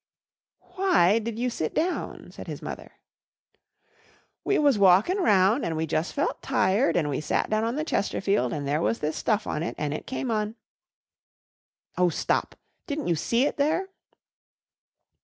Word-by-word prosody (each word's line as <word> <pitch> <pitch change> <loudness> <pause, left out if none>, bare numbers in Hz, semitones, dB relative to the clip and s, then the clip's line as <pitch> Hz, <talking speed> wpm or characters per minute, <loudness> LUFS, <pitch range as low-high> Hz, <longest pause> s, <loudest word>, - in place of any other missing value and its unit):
"Why 285 - +4
did 225 0 -5
you 245 +1 -1
sit 160 -8 -3
down," 350 +3 -2
said - - -10
his - - -7
mother. - - -7 1.5
"We 405 - +1
was 285 -7 +3
walkin' 200 - +5
round 210 - +3
an' 165 - -2
we 160 +1 -1
jus' 160 +2 -1
felt 285 - -2
tired 245 -1 +2
and 160 -4 +1
we 145 0 -2
sat 155 - -1
down 215 0 +1
on 230 +2 -1
the 305 - -1
Chesterfield 200 -7 0
and 145 -3 -3
there 150 +3 0
was 230 - +1
this 155 +1 -2
stuff 215 -2 0
on 150 - -3
it 170 - -3
an' 150 -1 -2
it 155 - -6
came 260 -1 -3
on 215 0 -1 0.7
" - - -45
"Oh, 180 -1 +4
stop! - - -1 0.3
Didn't 295 - -3
you 170 - +3
see 235 - +1
it - - -2
there?" 320 +7 +1
215 Hz, 170 wpm, -26 LUFS, 170-280 Hz, 1.5 s, walkin